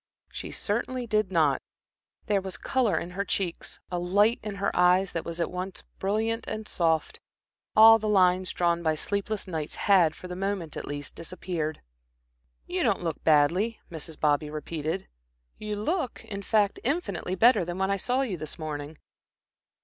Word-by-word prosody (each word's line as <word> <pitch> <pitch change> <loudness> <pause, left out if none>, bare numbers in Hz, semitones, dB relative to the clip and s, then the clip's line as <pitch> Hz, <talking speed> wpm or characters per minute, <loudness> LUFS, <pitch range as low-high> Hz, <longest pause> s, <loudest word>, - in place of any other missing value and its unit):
She - - -6
certainly 245 +4 -2
did 215 -4 +1
not. 155 -6 +3 0.6
There 205 -2 +1
was 190 -1 -6
color 250 -5 +1
in 175 - -4
her 195 +2 -2
cheeks, 185 -4 -3
a 175 - -1
light 205 +6 +3
in 210 -2 -5
her 200 0 -1
eyes 180 +2 +4
that 165 - -3
was 170 0 -6
at 170 - -1
once 185 +1 -5 0.2
brilliant 220 +4 -1
and 215 0 -4
soft. 165 -3 0 0.6
All 225 +1 +9
the 215 0 -2
lines 185 -2 +3
drawn 170 -1 +1
by 160 -2 +1
sleepless 200 +5 -2
nights 160 -4 -4
had, 180 -6 +4
for 185 - -9
the 180 - -6
moment 190 -4 -3
at - - -6
least, 145 -1 -5
disappeared. 165 -2 -4 0.8
"You - - -2
don't - - +1
look 165 -3 -3
badly," 170 +9 +3
Mrs. 160 -1 -8
Bobby 150 0 +2
repeated. 155 +3 -4 0.5
"You 210 0 -3
look, 265 - -2
in 200 -1 -5
fact, 205 0 +2
infinitely 200 - -1
better 230 +1 +5
than 175 +1 -4
when 190 +1 +1
I 200 - +1
saw 250 +7 0
you 220 -9 -2
this 155 -2 -6
morning." 150 -1 -5
185 Hz, 170 wpm, -27 LUFS, 165-210 Hz, 0.8 s, All